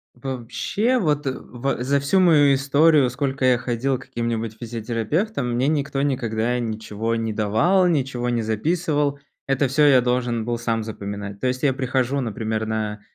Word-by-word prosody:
Вообще, 135 - -1
вот 150 - 0
э 135 - +1
ва 125 0 -3
за 140 +2 +2
всю 140 +8 +2
мою 150 -6 +5
историю, 140 +1 +4
сколько 135 +1 -2
я 125 -1 +4
ходил 125 +2 -1
к - - -13
каким-нибудь 115 -1 -3
физиотерапевтам, 120 - -2
мне 130 +3 +1
никто 140 -2 0
никогда 120 -3 0
ничего 110 -1 -3
не 115 -1 -2
давал, 110 - +2
ничего 135 -7 0
не 120 -1 0
записывал. 145 - 0 0.3
Это 135 0 +1
всё 145 +3 +3
я 135 -3 +6
должен 125 -2 -1
был 120 0 -2
сам 115 -1 -1
запоминать. 100 -2 -6
То - - -1
есть 125 0 -1
я 140 -3 +3
прихожу, 130 +1 -1
например, 110 -2 -3
на 110 -1 -3
125 Hz, 165 wpm, -22 LUFS, 115-140 Hz, 0.3 s, я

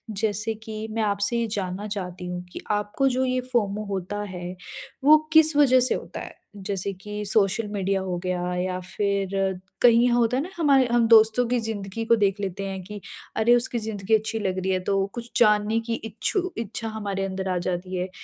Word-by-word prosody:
जैसे 215 +1 0
कि 220 0 -7
मैं 225 +1 -2
आपसे 205 +3 +1
ये 235 - 0
जानना 195 0 -3
चाहती 185 -3 -6
हूँ 180 0 -5
कि - - -7
आपको 210 +6 0
जो 260 +1 +1
ये 255 0 0
फोमो 210 -2 0
होता 200 +1 -4
है 180 0 -7 0.5
वो 305 +2 +8 0.2
किस 315 -1 +7
वजह 260 -3 +5
से 255 - +8
होता - - -7
है? - - -9 0.2
जैसे 200 -1 -2
कि 210 +2 -7
सोशल 210 +1 +2
मीडिया 195 -1 -1
हो 180 -2 -3
गया 180 0 -2
या 185 0 -2
फिर 200 +1 -2 0.5
कहीं 240 0 +5
होता 240 +1 +2
है 280 - 0
ना 355 - -7
हमारे 280 -5 +4
हम 235 -1 +3
दोस्तों 225 +2 +5
की 245 0 +1
ज़िंदगी 220 -1 -4
को 230 +1 +4
देख 200 -1 +1
लेते 195 0 -4
हैं 190 -1 -5
कि 205 +1 -9 0.4
अरे, 235 +2 +4
उसकी 240 0 0
ज़िंदगी 215 -1 0
अच्छी 220 +1 -2
लग 190 -3 -2
रही 190 +1 -1
है। 185 - 0
तो 195 0 +1
कुछ 240 0 -7
जानने 210 0 +3
की 230 - +1
इच्छु 365 - -2
इच्छा 225 0 -4
हमारे 200 -3 -3
अंदर 190 0 -4
आ 180 - 0
जाती 185 +1 -3
है 180 +1 -3
210 Hz, 200 wpm, -24 LUFS, 190-230 Hz, 0.5 s, वो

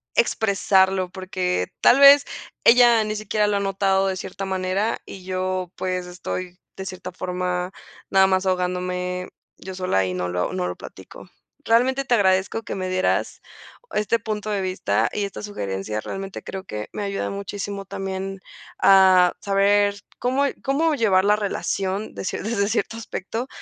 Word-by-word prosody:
expresarlo, 195 - +2
porque 180 - -2
tal 265 - +6
vez 280 +1 +9 0.4
ella 235 -2 +6
ni 215 0 -3
siquiera 210 0 0
lo 205 -1 +1
ha - - 0
notado 195 0 +1
de 190 - -1
cierta 195 +1 -6
manera 190 +3 -1
y 190 - -10
yo, 185 -1 -2
pues, 185 -1 -2
estoy 180 0 -6 0.2
de 190 - -7
cierta 185 -1 -7
forma, 180 0 -3 0.4
nada 190 0 +5
más 190 0 +1
ahogándome 180 0 -2 0.3
yo 190 0 -8
sola 185 - +1
y 90 - -3
no 90 0 -2
lo 90 0 -2
no 90 -1 -1
lo 90 - -4
platico. - - -12 0.4
Realmente 260 +4 +2
te 245 - +1
agradezco 190 +1 +2
que - - -5
me 185 -1 -3
dieras 185 0 0 0.5
este 210 +2 +1
punto 215 -1 -4
de 200 -2 0
vista 185 +1 0
y 205 - -2
esta 200 - -7
sugerencia, 105 - -4
realmente 195 - -6
creo 190 -1 -6
que 105 - -6
me - - -4
ayuda 200 0 -2
muchísimo 200 0 -5
también 195 0 -5 0.4
a 185 -2 +6
saber 200 +1 +3 0.2
cómo 260 +3 +1 0.2
cómo 305 +4 +1
llevar 200 -6 +3
la 210 +1 +5
relación 200 0 -2
de - - -6
cie - - -3
desde 215 -2 0
cierto 225 0 -1
aspecto 230 +2 -5
190 Hz, 160 wpm, -23 LUFS, 185-210 Hz, 0.5 s, vez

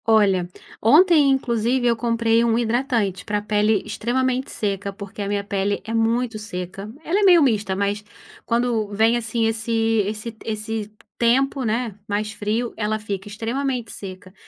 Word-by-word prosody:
Olha, 200 -5 +3 0.3
ontem 300 - +6
inclusive, 245 -1 +1
eu 235 -1 +4
comprei 230 0 +2
um 230 -1 +2
hidratante 230 -5 0
pra 210 0 -1
pele 210 0 +1
extremamente 250 +4 -1
seca. 200 -1 -2
Porque, 200 0 -8
a 200 - -2
minha 200 0 -1
pele 200 0 -1
é 225 - -4
muito 230 0 +1
seca, 195 0 -6
ela 375 +5 +1
é - - +2
meio 355 -5 +7
mista, 210 -7 +1
mas, 200 +1 -1 0.4
quando, 235 -2 0
vem 220 +3 +3
assim 230 0 -1
esse 225 +1 -1 0.4
esse 215 +2 -4
t 220 - -18
esse 215 0 -4 0.3
tempo, 265 +3 +2
né, 230 0 -1
mais 210 +1 -1
frio, 220 +3 -2
ela 215 0 -1
fica 205 -2 -5
extremamente 235 +2 -3
seca. 185 -1 -9
225 Hz, 155 wpm, -22 LUFS, 205-240 Hz, 0.4 s, meio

